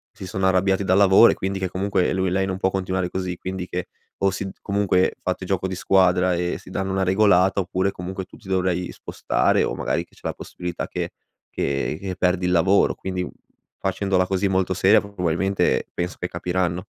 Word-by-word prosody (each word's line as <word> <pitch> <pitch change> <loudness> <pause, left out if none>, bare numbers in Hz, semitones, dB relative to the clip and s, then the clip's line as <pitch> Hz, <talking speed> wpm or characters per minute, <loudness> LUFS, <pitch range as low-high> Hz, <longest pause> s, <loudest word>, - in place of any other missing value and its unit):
si 105 -4 -8
sono 95 +1 -2
arrabbiati 95 +1 +2
dal 95 0 +3
lavoro 100 +3 +7
e - - -2
quindi 95 +1 -3
che, 95 -1 -2
comunque, 95 0 0
lui 95 0 0
lei 95 +1 +1
non 95 -1 -2
può 95 - +1
continuare 95 -1 -1
così. 90 0 -3
Quindi, 95 0 -5
che 90 -1 -4 0.3
o 100 - +3
si 100 +1 -4
d - - -6
comunque 100 -2 +1
fate 95 0 -2
gioco 95 0 -1
di 95 - -4
squadra 90 -1 +3
e 90 0 -1
si - - -14
danno 95 +1 -2
una 95 0 0
regolata 95 0 +4
oppure, 95 +1 -1
comunque, 95 +1 -6
tu - - -16
ti 105 - -17
dovrai 90 -1 0
spostare - - 0
o - - -1
magari - - -1
che - - -35
c'è - - -21
la - - -2
possibilità 90 -1 -6
che - - -3 0.4
che 70 +2 -2
che 95 -2 -4
perdi 90 0 +1
il 90 - +1
lavoro. 90 +3 +4
Quindi 90 -1 -4 0.5
facendola 95 -1 0
così, 95 +1 0
molto 95 -1 +1
seria, 95 +2 +5
probabilmente 95 -1 0
penso 90 +1 -3
che 90 - -2
capiranno. 90 0 -2
95 Hz, 200 wpm, -23 LUFS, 90-95 Hz, 0.5 s, lavoro